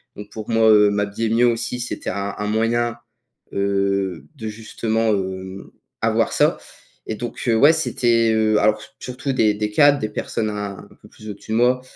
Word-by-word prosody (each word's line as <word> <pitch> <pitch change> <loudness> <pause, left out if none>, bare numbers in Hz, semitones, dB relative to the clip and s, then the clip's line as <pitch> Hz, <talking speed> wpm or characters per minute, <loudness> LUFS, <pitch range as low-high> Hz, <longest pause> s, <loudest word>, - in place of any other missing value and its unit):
donc 105 0 -10
pour 110 0 -8
moi, 115 -1 +4
heu, 105 -1 +6
m'habiller 100 +2 -1
mieux 120 +2 +3
aussi, 120 +1 -1
c'était 120 - -4
un 100 +1 -3
un 105 - -3
moyen, 115 +2 0 0.6
heu, 100 -2 -1
de 110 -6 -7
justement, 110 +1 -2
hem, 95 0 -5 0.3
avoir - - +1
ça - - +3 0.5
et 110 - -3
donc 120 +1 -6
heu, 115 - +3
ouais, 145 +7 +6
c'était, 120 -7 +1
heu, 110 -1 +2
alors 110 0 +2
s - - -14
surtout 130 +2 -4
des, 110 -4 +3
des 105 0 -3
cadres, 145 +4 +5
des 110 - -3
personnes 110 0 -3
un 105 -2 -5
un - - -14
peu - - -16
plus 110 - -12
au 105 - -4
dessus 100 - -12
de 110 - +1
moi, 125 +2 +3
110 Hz, 195 wpm, -21 LUFS, 105-115 Hz, 0.6 s, heu